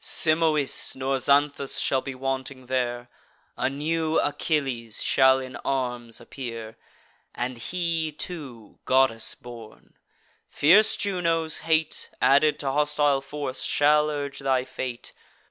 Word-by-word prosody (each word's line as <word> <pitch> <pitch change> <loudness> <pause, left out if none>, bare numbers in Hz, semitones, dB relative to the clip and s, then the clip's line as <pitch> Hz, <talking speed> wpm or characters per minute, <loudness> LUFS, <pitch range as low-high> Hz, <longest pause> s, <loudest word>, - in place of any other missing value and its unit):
Simois 155 -3 +2
nor 135 +1 -1
Xanthus 140 +1 +2
shall 130 - +1
be 135 0 -7
wanting 130 0 -4
there: 120 -1 -2 0.5
A - - 0
new 160 +3 -1
Achilles 135 -7 -1
shall 130 -1 +4
in 130 -1 -7
arms 125 -4 -3
appear, 115 -3 -8 0.6
And 125 0 -4
he, 165 +2 -2
too, 140 - -8
goddess 130 -4 +2
born. 115 -3 -13 0.6
Fierce 200 +9 +5
Juno's 165 -5 -1
hate, 160 -1 0
Added 145 +2 +4
to 135 -2 -1
hostile 145 -1 +2
force, 140 -1 -5
shall 150 +1 +3
urge 145 -2 -4
thy 130 -2 0
fate. 130 -2 -6
135 Hz, 115 wpm, -25 LUFS, 130-150 Hz, 0.6 s, Fierce